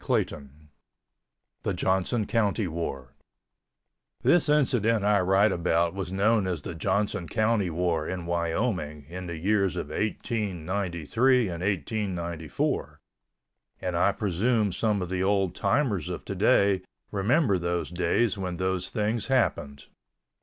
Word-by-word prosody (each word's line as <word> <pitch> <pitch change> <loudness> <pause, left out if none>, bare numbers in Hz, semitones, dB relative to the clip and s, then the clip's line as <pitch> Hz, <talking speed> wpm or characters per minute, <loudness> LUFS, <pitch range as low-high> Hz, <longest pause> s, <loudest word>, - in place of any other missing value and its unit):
CHAPTER - - +2 0.2
XV 70 -1 -14 1.1
THE - - -1
JOHNSON 95 +4 0
COUNTY 105 -2 +1
WAR 70 -6 -5 1.1
This 175 -4 +4
incident 115 -7 +2
I 105 -1 +4
write 95 +3 +3
about 85 -1 +1
was 95 -1 -5
known 100 +1 +2
as 85 -6 -3
the - - -5
Johnson 100 +2 -1
County 110 -4 +1
War 85 -1 -1
in 90 -2 -4
Wyoming 85 - -2
in 90 +1 -6
the 85 -1 -5
years 95 +1 +1
of 75 - -4
1893 100 - 0
and 85 -1 -5
1894, 90 -5 -2 0.8
and 90 -1 -3
I 90 +4 +3
presume 105 +2 0
some 105 -2 0
of 90 - -6
the 95 0 -1
old 95 -1 +1
timers 100 - 0
of - - -5
today 100 -2 +3 0.3
remember 105 - +2
those 85 0 -2
days 95 +5 +1
when 90 -2 -3
those 95 0 -1
things 110 0 -1
happened. 75 - 0
95 Hz, 130 wpm, -27 LUFS, 85-105 Hz, 1.1 s, This